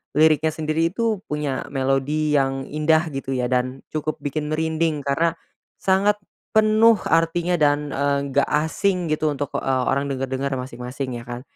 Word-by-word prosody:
liriknya 155 0 +4
sendiri 160 +1 0
itu 225 -4 0
punya 150 -3 -3
melodi 140 +3 0
yang 135 0 -1
indah 155 +1 +1
gitu 135 -1 -3
ya 125 0 -1
dan 130 +1 -1
cukup 155 0 -2
bikin 150 +1 -2
merinding 160 -1 0
karena, 165 +4 +1 0.4
sangat 195 +2 +2 0.4
penuh 220 +1 +6
artinya 165 +1 +1
dan, 145 0 +2
eee, 140 0 +1
enggak 140 +1 +2
asing 165 +2 0
gitu 155 0 +1
untuk, 145 -1 -2
eee, 130 -1 0
orang 140 +1 0
dengar-dengar 135 0 -2
masing-masing 125 0 -5
ya 115 - -12
kan. 120 0 -6
150 Hz, 150 wpm, -22 LUFS, 135-160 Hz, 0.4 s, penuh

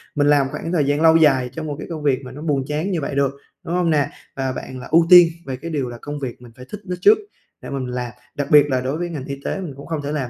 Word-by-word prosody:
mình 145 -1 +2
làm 145 -2 +4
khoảng 165 - -5
thời 160 -5 +2
gian 145 +2 +1
lâu 160 0 +6
dài 135 -6 +4
trong 155 +3 -5
một 145 - -3
cái - - -7
công 160 -3 -6
việc 135 -3 +2
mà 125 - -8
nó 145 - -10
buồn 145 -4 0
chán 155 +6 -2
như 170 -4 -1
vậy 140 - -4
được, 140 -1 +2 0.3
đúng 170 - -4
hông 180 -2 +1
nè? 150 -3 +2 0.3
Và 135 -1 -2
bạn 130 0 -7
là - - -9
ưu 165 +1 +5
tiên 180 -2 +10 0.2
về 135 - -4
cái 165 +6 -7
điều 140 -5 -2
là 120 - -8
công 145 0 -6
việc 130 -3 -6
mình 120 -1 -13
phải 125 0 -12
thích 210 0 -7
nó 180 -2 -3
trước 430 - +7 0.4
để - - -8
mà 140 - -3
mình 130 - -4
làm. 125 -1 -3 0.2
Đặc 145 - -2
biệt 150 -2 +8
là 130 -2 +1
đối 135 +4 -2
với 175 +1 -3
ngành 150 -6 -6
y 140 0 -6
tế - - -2
mình 175 -7 -6
cũng 140 - -10
không 160 -3 -3
thể 145 0 -4
làm 140 -5 -2
145 Hz, 320 wpm, -21 LUFS, 135-160 Hz, 0.4 s, tiên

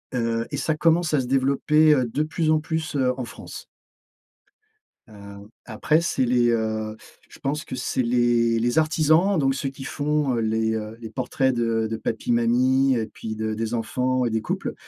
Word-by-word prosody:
Heu, 115 -1 -1
et - - -3
ça 155 - 0
commence 165 +1 +2
à 150 - +3
se 125 - -5
développer, 140 +4 +3
heu, 130 -3 +2
de 150 - 0
plus 155 +1 -1
en 155 - +3
plus, 160 -1 -4
heu, 130 -2 +2
en 125 - -3
France. - - -10 1.4
Heu, 100 -1 -12 0.2
après, 140 +8 +1
c'est 135 -6 0
les, 120 -1 +2
heu, 110 -1 -2 0.3
je - - -15
pense 145 +3 -2
que - - -7
c'est 130 +1 -1
les 120 -1 +2
les 120 +4 +1
artisans, 160 +4 +3
donc 135 -3 +2
ceux 135 - -2
qui 135 0 -10
font, 145 -3 -1
heu, - - 0
les, 110 0 0
heu, 110 +1 -6
les 115 -2 -8
portraits 130 0 0
de 115 -2 0
de 110 - -2
papi, 115 +2 -4
mamie 130 +3 +3
et 110 -2 -1
puis 110 -1 -7
de 110 0 -3
des 115 +2 -3
enfants 125 +2 -1
et 115 - -1
des 110 0 -1
couples, - - -3
125 Hz, 195 wpm, -23 LUFS, 115-150 Hz, 1.4 s, à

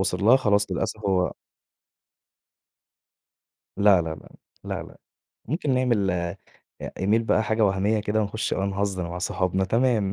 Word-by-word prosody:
وصل 95 0 0
لها 125 +4 +7
خلاص 105 -5 +1
للأسف 85 - -2
هو 90 -3 +1 2.4
لا، 100 -3 +5
لا، 80 -1 -4
لا، 75 - -15 0.4
لأ، - - -4
لأ. - - -14 0.5
ممكن 150 -4 -1
نعمل 120 -7 +1
إ 85 +1 -2 0.6
Email 110 +4 +2
بقى 110 -1 +2
حاجة 110 -1 +1
وهمية 100 +2 +1
كده، 105 +1 0
ونخش 110 +1 -2
بقى 95 - -1
نهزر 95 -3 -2
مع 90 +1 -5
صحابنا 90 +1 0
تمام 115 -3 +1
100 Hz, 140 wpm, -25 LUFS, 95-110 Hz, 2.4 s, لها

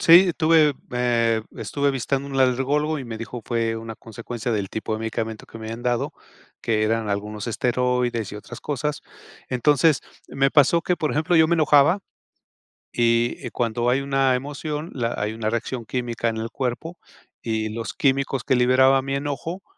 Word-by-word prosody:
sí, 175 +3 +8
estuve, 160 -3 +4 0.2
eh, 115 -2 +2
estuve 140 0 0
vistando 135 +1 -2
un 135 -1 -3
alergólogo 140 +4 +2
y 135 - -6
me 115 -2 -6
dijo: 115 +1 -7
"Fue 115 -1 -1
una 115 0 -7
consecuencia 115 +1 -5
del 100 -3 -2
tipo 110 0 -3
de - - -3
medicamento 110 -1 -4
que 115 - -12
me 110 - -7
habían 115 +2 -6
dado", 120 -1 0 0.5
que 110 -2 +1
eran 110 0 0
algunos 105 +1 -3
esteroides 125 -2 0
y - - -6
otras 105 - -9
cosas. 150 +1 -2 0.5
Entonces, 145 +4 +3 0.3
me 135 0 +1
pasó 150 +4 +5
que, 180 +1 0
por 155 -3 -1
ejemplo, 160 +3 +1
yo 160 0 +6
me 170 - +2
enojaba, 150 +3 +5 0.9
y 120 0 +1
cuando 120 0 0
hay 130 +2 +2
una 135 -1 +2
emoción, 150 +4 -4
la 120 -3 -1
hay 105 +1 -1
una 110 -1 -2
reacción 115 +1 -3
química 120 0 -2
en 110 -1 -1
el 115 +1 -3
cuerpo 135 +7 -3 0.4
y 110 -1 -2
los 115 +1 -5
químicos 135 -1 +1
que 130 - +2
liberaba 130 +2 +5
mi 135 +1 -3
enojo 145 +6 -4
125 Hz, 175 wpm, -23 LUFS, 115-140 Hz, 0.9 s, sí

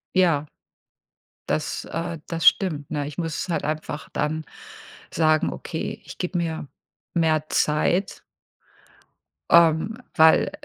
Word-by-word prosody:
Ja. 170 -6 +3 1.0
Das, - - -2
äh, 165 0 -4
das 165 -1 -3
stimmt, 155 -8 0
ne? 145 -2 -2
Ich 145 - -9
muss 165 +1 -3
halt 170 - -1
einfach 150 -2 -4
dann 155 +1 -1 0.7
sagen: 155 -1 +2
„Okay, - - -5
ich - - -11
gebe 180 0 -2
mir 165 -3 -3 0.5
mehr 160 -2 +2
Zeit" 175 +5 +1 1.3
ähm, 170 +6 +4 0.2
weil, 160 0 +5
160 Hz, 115 wpm, -24 LUFS, 150-170 Hz, 1.3 s, weil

